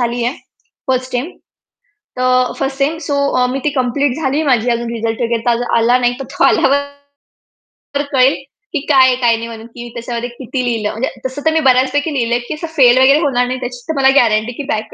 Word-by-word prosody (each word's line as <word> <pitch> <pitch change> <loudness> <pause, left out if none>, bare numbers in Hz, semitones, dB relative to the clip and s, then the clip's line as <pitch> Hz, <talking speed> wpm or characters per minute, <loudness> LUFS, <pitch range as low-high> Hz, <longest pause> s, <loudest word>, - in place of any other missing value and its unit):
झालीये 240 +1 -1 0.6
1st 255 0 -1
टेम, 255 +8 -2 0.9
तर 255 0 +2
1st 270 -1 -2
same, 295 +4 0
so 285 - 0 0.3
अ, - - +3
मी 270 - -2
ती 300 - +2
कंप्लीट 255 +2 0
झालीये 285 +3 0
माझी 240 0 +1
अजून 235 0 -5
रिझल्ट 225 +1 -3
वगैरे 230 -1 -1
तर - - +4
अज - - -2 0.2
आला 240 +2 +3
नाही, 245 - +3
तर - - -4
तो 275 - +1
आल्यावर 280 +1 +3 1.1
तर 285 - +1
कळेल 265 -1 +4 0.4
की 305 - 0
काय 265 -3 +6
आहे, 255 - +3
काय 240 -2 +2
नाही 230 +1 -6
म्हणून 225 0 -9
की 240 - -7
मी 240 - -8
त्याच्यामध्ये 235 +1 -5
किती 250 +1 -5
लिहिलं. 225 -3 -1
म्हणजे 235 +5 -2 0.2
तसं 260 +2 -4
तर 320 - +4
मी 320 - +2
बऱ्याचपैकी 265 +4 +1
लिहिलंय 240 -2 0
की - - -3
असं 320 +2 -6
फेल 250 -2 +6
वगैरे 275 +3 +5
होणार 255 -6 +1
नाही, 255 0 -3
त्याची 245 -1 -6
तर 320 - -1
मला 265 0 +5
गॅरंटी 220 0 +1
की 290 - -4
बॅक 215 0 -5
255 Hz, 215 wpm, -16 LUFS, 240-275 Hz, 1.1 s, काय